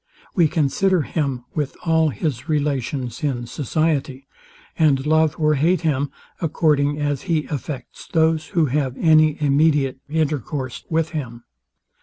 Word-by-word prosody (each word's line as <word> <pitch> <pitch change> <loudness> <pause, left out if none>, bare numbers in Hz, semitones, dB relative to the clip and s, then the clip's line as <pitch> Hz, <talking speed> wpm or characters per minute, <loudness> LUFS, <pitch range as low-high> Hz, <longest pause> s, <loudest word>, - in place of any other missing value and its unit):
We 170 -4 +4
consider 165 +3 +1
him 135 -5 -2
with 150 -3 -3
all 160 -1 +3
his 135 +3 -3
relations 140 -3 -2
in 125 -5 -1
society; 140 +1 -1 0.5
and 145 -4 +2
love 155 0 +3
or 155 -1 +3
hate 165 +6 +2
him, 145 -4 0 0.3
according 145 -3 +1
as 145 -2 -1
he 155 -3 +1
affects 140 -2 -6
those, 160 -1 +2
who 165 - +5
have 135 -1 -1
any 155 -2 +4
immediate 145 -2 +2
intercourse 145 -4 -2
with 165 0 +1
him. 120 -7 -5
150 Hz, 130 wpm, -21 LUFS, 135-160 Hz, 0.5 s, who